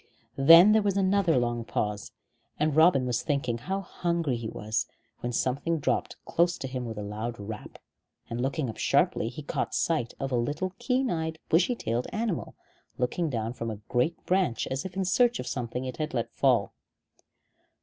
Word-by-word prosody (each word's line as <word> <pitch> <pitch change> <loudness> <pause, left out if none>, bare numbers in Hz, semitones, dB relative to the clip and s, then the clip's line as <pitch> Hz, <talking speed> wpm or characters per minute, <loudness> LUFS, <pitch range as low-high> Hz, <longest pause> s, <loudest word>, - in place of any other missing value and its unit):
Then 165 +8 +9
there 220 0 +5
was 200 -1 0
another 190 -5 +3
long 120 -1 0
pause, 105 -2 -3 0.5
and 150 -1 +1
Robin 160 -5 +5
was 125 -1 0
thinking 140 -6 -1
how 190 +10 -3
hungry 170 -6 -1
he 115 -1 -4
was, 110 +1 -2 0.3
when 120 - -3
something 140 +7 0
dropped 145 - -1
close 175 +1 +2
to 135 - -5
him 130 -1 -4
with 110 -2 -6
a 105 - -4
loud 110 +3 -5
rap, 105 +1 -8 0.5
and 120 +1 -4
looking 135 +2 -1
up 110 - -6
sharply, 115 - +2
he 140 +5 -8
caught - - -2
sight 155 -9 0
of 135 -1 -3
a - - +1
little 145 +10 -1
keen 255 +1 +1
eyed 160 -1 -2
bushy 180 +9 +3
tailed 120 - -2
animal, 215 -5 -2 0.4
looking 155 +7 0
down 115 -3 -2
from 115 -2 -4
a 110 - -4
great 125 +8 +1
branch 180 - +1
as 135 +4 -2
if 190 -1 -6
in 190 0 0
search 240 +6 +3
of - - -4
something 125 0 -3
it 130 -2 -5
had 155 -3 -3
let 115 - -2
fall. - - +2
135 Hz, 185 wpm, -28 LUFS, 120-175 Hz, 0.5 s, Then